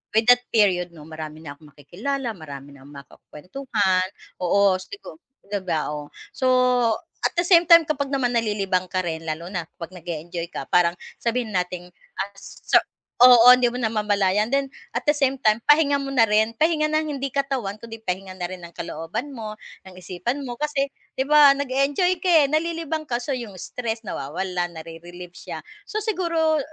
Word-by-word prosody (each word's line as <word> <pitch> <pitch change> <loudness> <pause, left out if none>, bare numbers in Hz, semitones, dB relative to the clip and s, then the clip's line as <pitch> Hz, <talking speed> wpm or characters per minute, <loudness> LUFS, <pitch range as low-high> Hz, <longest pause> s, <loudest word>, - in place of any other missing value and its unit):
with 220 0 +3
that 245 0 +4
period 180 -5 +3
'no, 155 -3 -12
marami 155 -1 -8
na 140 - -7
akong 150 +1 -18
makikilala, 235 - -4
marami 145 -4 -10
na 135 - -16
akong 145 0 -14
makakuwentuhan. 185 - -2 0.4
Oo, 195 +2 +4
sigu 400 - -11 0.3
'di 200 -1 -3
ba, 160 -4 -1
oh, 145 0 -8 0.2
so 260 - 0 0.8
at - - +1
the - - +3
same 345 -2 +7
time 335 0 +8
kapag 280 -2 -2
naman 250 -3 +1
nalilibang 200 -5 0
ka 185 - 0
rin 165 -1 -4
lalo 160 +2 -4
na 180 -3 -3
kapag 175 +2 -10
nag-e-enjoy 170 0 -5
ka - - -5
parang 175 -1 +3 0.3
sabihin 235 0 -1
nating, 180 -1 -2 0.3
ah, 200 - -2
so - - 0 0.4
oo 245 -1 +9
hindi 250 0 +7
mo 250 - -5
namamalayan 210 -1 +1
then 275 0 +1 0.2
at - - -1
the 295 - +4
same 270 -1 +1
time 215 -1 +4
pahinga 295 -1 +5
mo 275 - -5
na 230 -4 +4
rin, 220 +1 +2
pahinga 310 +5 +2
ng 310 0 +1
hindi 275 -1 -3
katawan 260 -8 -2
kundi 225 -1 -8
pahinga 185 0 -4
na 180 - -3
rin 185 0 -8
ng 170 0 -11
kalooban 170 - -5
mo, 215 -4 -6 0.3
ng 185 - -13
isipan 185 +10 -4
mo 245 -1 -7
kasi 295 -2 0 0.3
'di 265 - +2
ba 295 -2 +7
nag-e-enjoy 280 +7 +1
ka, - - -2
eh, 320 -5 +5
nalilibang 320 -1 -2
ka 240 - -1
so 280 - -3
'yong 235 -6 -5
stress 225 +4 -5
nawawala 180 0 -3
na-re-relieve 175 +2 -10
siya - - -8 0.2
so 430 - -4
siguro 335 -7 +1
220 Hz, 180 wpm, -23 LUFS, 180-275 Hz, 0.8 s, oo